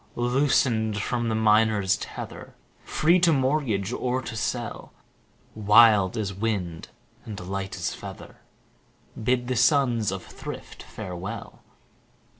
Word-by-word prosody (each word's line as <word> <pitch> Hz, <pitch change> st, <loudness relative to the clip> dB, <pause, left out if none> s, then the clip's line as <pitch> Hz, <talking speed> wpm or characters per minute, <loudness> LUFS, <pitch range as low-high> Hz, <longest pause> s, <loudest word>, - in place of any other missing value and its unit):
Loosen'd 120 Hz, -4 st, +1 dB
from 120 Hz, +2 st, -1 dB
the 110 Hz, -, 0 dB
minor's 110 Hz, -2 st, +3 dB
tether, -, -, -8 dB, 0.3 s
5 -, -, -17 dB
Free 170 Hz, +4 st, +4 dB
to 175 Hz, -1 st, +4 dB
mortgage 130 Hz, -7 st, 0 dB
or 125 Hz, 0 st, -1 dB
to 115 Hz, -, -6 dB
sell, 115 Hz, +3 st, -4 dB, 0.6 s
Wild 105 Hz, -2 st, +5 dB
as 100 Hz, -3 st, -2 dB
wind, 95 Hz, -5 st, -3 dB, 0.4 s
and 105 Hz, -2 st, -7 dB
light 95 Hz, +1 st, -4 dB
as -, -, -3 dB
feather, -, -, -10 dB, 0.9 s
Bid 125 Hz, +1 st, +1 dB
the 130 Hz, -, -1 dB
sons 120 Hz, -4 st, +3 dB
of 95 Hz, -1 st, -5 dB
thrift -, -, -9 dB
farewell. 95 Hz, +5 st, -7 dB
110 Hz, 120 wpm, -25 LUFS, 100-125 Hz, 0.9 s, Wild